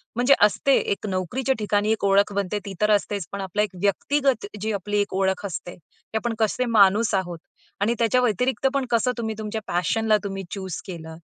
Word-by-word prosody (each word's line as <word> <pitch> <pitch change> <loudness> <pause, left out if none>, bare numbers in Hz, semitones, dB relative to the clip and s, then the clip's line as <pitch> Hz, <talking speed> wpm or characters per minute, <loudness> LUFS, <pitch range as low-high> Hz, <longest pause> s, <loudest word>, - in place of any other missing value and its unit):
म्हणजे 250 +3 +4
असते. 210 +6 +3
एक 200 +1 -2
नोकरीच्या 195 +9 -1
ठिकाणी 210 +1 +1
एक 220 - -1
ओळख 200 +1 +3
बनते 200 +1 -1
ती 195 - -6
तर 210 0 +3
असतेच 200 -3 0
पण 200 0 -4
आपला 195 +2 -1
एक 210 - 0
व्यक्तिगत 265 +4 +1 0.2
जी 220 0 -1
आपली 205 +1 -1
एक 200 - -3
ओळख 190 +1 0
असते 175 -1 -5
की 180 +6 -9
आपण 235 +1 -2
कसे 225 +3 +1
माणूस 210 -1 +4
आहोत 175 -3 -2 0.4
आणि 225 +3 +2
त्याच्या 235 +2 +3
व्यतिरिक्त 250 +4 +1
पण 275 -2 0
कसं 235 +2 +2
तुम्ही 220 -2 -3
तुमच्या 215 0 -4
पॅशनला 215 +5 +1
तुम्ही 195 -1 -4
चूज 190 -4 -5
केलं 160 -3 -8
210 Hz, 190 wpm, -24 LUFS, 195-225 Hz, 0.4 s, म्हणजे